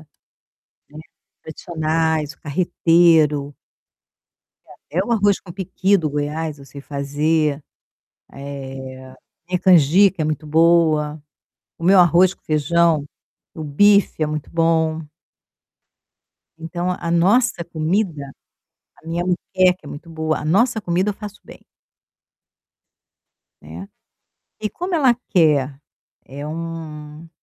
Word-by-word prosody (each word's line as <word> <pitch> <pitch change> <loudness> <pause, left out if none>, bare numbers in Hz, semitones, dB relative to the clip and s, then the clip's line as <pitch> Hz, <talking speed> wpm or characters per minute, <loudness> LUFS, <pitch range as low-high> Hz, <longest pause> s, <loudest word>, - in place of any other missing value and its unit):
né, 155 - -19 1.4
tradicionais, 160 -1 -2
carreteiro 160 -3 +2 1.4
e 160 - -9
até 190 - +2
o - - -5
arroz 205 -3 +2
com 175 - -11
piqui 190 +1 0
do 160 -4 -2
Goiás 150 +1 -3
eu 140 - -13
sei 140 +1 -11
fazer, 145 +2 -1
eh, 150 - -21 1.9
minha 180 -1 0
canjica 180 +2 +4
é - - 0
muito 155 0 -3
boa, 155 -1 +2 0.6
o 165 - -7
meu 190 +1 +5
arroz 180 +2 +5
com - - -41
feijão, 155 0 +1 0.5
o 160 - -7
bife 200 +4 +3
é - - +2
muito 150 -1 -5
bom. 160 -1 +1 1.6
Então 170 +2 -4
a 170 - -4
nossa 185 +3 +2
comida 160 -3 -2 0.7
a - - -16
minha 170 +2 -2
muqueca 185 0 +1
é 145 - -11
muito 165 +4 -10
boa 160 -1 -2
a 150 - -7
nossa 220 +7 +2
comida, 180 +3 0
eu - - -2
faço 205 0 -10
bem. - - -14 2.0
Né. 85 +6 -10 0.7
E 215 - -2
como 355 +1 -4
ela 270 -7 +4 0.2
quer? 145 -6 +2 0.5
É 140 +2 -8
um 160 -1 -7
165 Hz, 115 wpm, -20 LUFS, 150-180 Hz, 2.0 s, meu